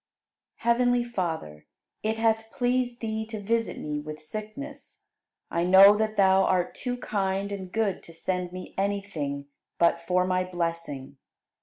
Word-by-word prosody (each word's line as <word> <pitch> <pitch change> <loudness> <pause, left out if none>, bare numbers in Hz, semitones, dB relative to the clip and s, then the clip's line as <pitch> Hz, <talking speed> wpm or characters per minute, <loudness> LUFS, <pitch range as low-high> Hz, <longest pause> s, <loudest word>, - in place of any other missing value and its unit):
69. 235 0 +3
Heavenly 245 0 +3
Father, 165 - -4 0.3
it 220 +1 -1
hath 225 0 +1
pleased 245 -1 0
Thee 220 -1 -2
to 220 -1 -5
visit 230 +3 0
me 150 -1 -3
with 155 +1 -7
sickness, 215 - -8 0.5
I 170 - +1
know 190 +3 +9
that 215 0 -1
Thou 190 -1 +5
art 180 -2 +1
too 250 -1 -3
kind 200 -4 -1
and 190 -2 -5
good 215 -3 0
to - - -12
send 180 +1 -2
me 185 0 -8
anything 195 -9 -2 0.3
but 170 0 +3
for 180 0 +3
my 185 0 +1
blessing. 165 -6 -4
195 Hz, 150 wpm, -27 LUFS, 175-225 Hz, 0.5 s, know